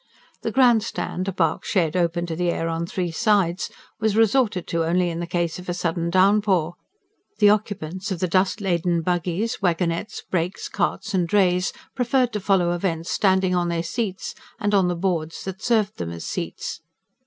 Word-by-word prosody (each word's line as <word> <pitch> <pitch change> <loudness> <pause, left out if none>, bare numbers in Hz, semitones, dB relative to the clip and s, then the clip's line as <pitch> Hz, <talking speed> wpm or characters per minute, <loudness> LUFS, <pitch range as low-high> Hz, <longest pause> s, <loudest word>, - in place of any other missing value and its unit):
The - - -1
Grand 245 -4 +5
Stand, 185 -3 -4
a - - 0
bark 170 -3 0
shed 165 -5 0
open 170 -1 +1
to 165 -1 -4
the 175 +1 0
air 165 -1 -1
on 165 +1 -2
three 175 -1 -2
sides, 195 -2 +1 0.3
was 220 -2 +1
resorted 225 -4 +3
to 165 -1 +1
only 175 +2 +1
in 165 - -4
the 170 - -3
case 175 -1 -1
of 180 - -9
a 175 - -1
sudden 170 -1 -1
downpour; 190 -2 +3 0.6
the 205 -1 +6
occupants 195 -2 -2
of 190 - -2
the 185 - +1
dust 185 +4 +1
laden 175 -3 +1
buggies, 180 +6 -1
wagonettes, 170 +1 -1
brakes, 180 +1 -2
carts 220 -2 -1
and 180 -3 +1
drays 180 -1 +2 0.2
preferred 250 0 +1
to 210 - -1
follow 185 -3 +2
events 170 -2 -2
standing 190 -2 +2
on 175 -1 +1
their 170 -1 -1
seats, 195 +2 -3 0.3
and 205 0 0
on 195 -3 +4
the 175 - 0
boards 170 -3 -2
that 190 +1 -6
served 215 -3 +1
them 85 - -3
as 85 0 -7
seats. - - -4
180 Hz, 185 wpm, -23 LUFS, 170-205 Hz, 0.6 s, the